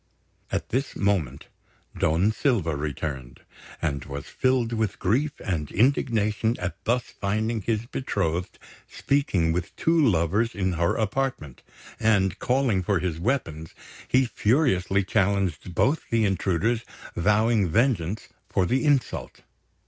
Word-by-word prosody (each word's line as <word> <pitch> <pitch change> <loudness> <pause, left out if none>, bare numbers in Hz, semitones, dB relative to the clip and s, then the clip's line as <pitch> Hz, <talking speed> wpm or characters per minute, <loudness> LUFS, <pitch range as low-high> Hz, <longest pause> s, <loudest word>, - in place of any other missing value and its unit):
At - - -2
this 135 +4 -2
moment 90 -10 0 0.5
Don 85 +7 +2
Silva 110 - 0
returned, 70 -3 -5 0.4
and 70 -3 -2
was 70 +1 -6
filled 130 -3 0
with 110 -3 -1
grief 135 +10 +1
and 80 -7 -2
indignation 115 -2 +1
at 90 +2 -5
thus 120 +2 +2
finding 110 +1 -2
his 110 +2 -1
betrothed 90 -9 -2 0.3
speaking 100 - +1
with 85 +1 -3
two 165 -1 +2
lovers 100 - +2
in 95 -2 0
her 85 0 +1
apartment; 110 - -2 0.4
and, 100 -5 +2
calling 125 -6 +1
for 95 +2 +1
his 85 -2 -2
weapons, 85 - -2 0.3
he 130 +1 +3
furiously 105 - +1
challenged 95 -3 0
both 145 - +1
the 115 -2 +2
intruders, 95 +4 0 0.3
vowing 105 +2 +2
vengeance 110 - 0 0.2
for 95 - +1
the 130 - +1
insult. 145 -4 0
100 Hz, 125 wpm, -25 LUFS, 85-120 Hz, 0.5 s, he